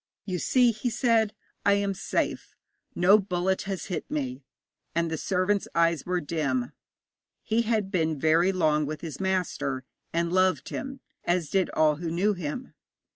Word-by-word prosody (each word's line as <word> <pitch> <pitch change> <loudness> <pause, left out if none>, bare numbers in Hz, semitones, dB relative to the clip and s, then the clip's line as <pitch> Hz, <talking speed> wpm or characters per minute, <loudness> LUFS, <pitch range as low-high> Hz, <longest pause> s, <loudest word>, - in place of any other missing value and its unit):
'You 185 -3 -2
see,' 250 +4 +4
he 240 +3 -2
said, 225 -3 +2 0.3
'I 200 - +5
am 200 -1 +1
safe. 190 - -2 0.4
No 195 +4 +6
bullet 185 -1 0
has 190 -2 -3
hit 180 - -4
me.' 135 -3 -3 0.5
And 170 -1 +1
the - - 0
servant's 190 +3 0
eyes 170 -2 +2
were 180 0 +1
dim. 140 -6 -1 0.7
He 225 +2 +1
had 215 -4 0
been 160 -5 0
very 165 +5 +4
long 155 -5 +2
with 155 +1 -5
his 155 -5 -6
master, 170 -8 -1 0.3
and 170 +1 0
loved 185 -6 +2
him, 270 -1 -5 0.2
as 175 -4 0
did 190 -2 +2
all 155 -1 +4
who 165 +1 -4
knew 185 +6 +2
him. 180 - -5
180 Hz, 160 wpm, -27 LUFS, 155-200 Hz, 0.7 s, No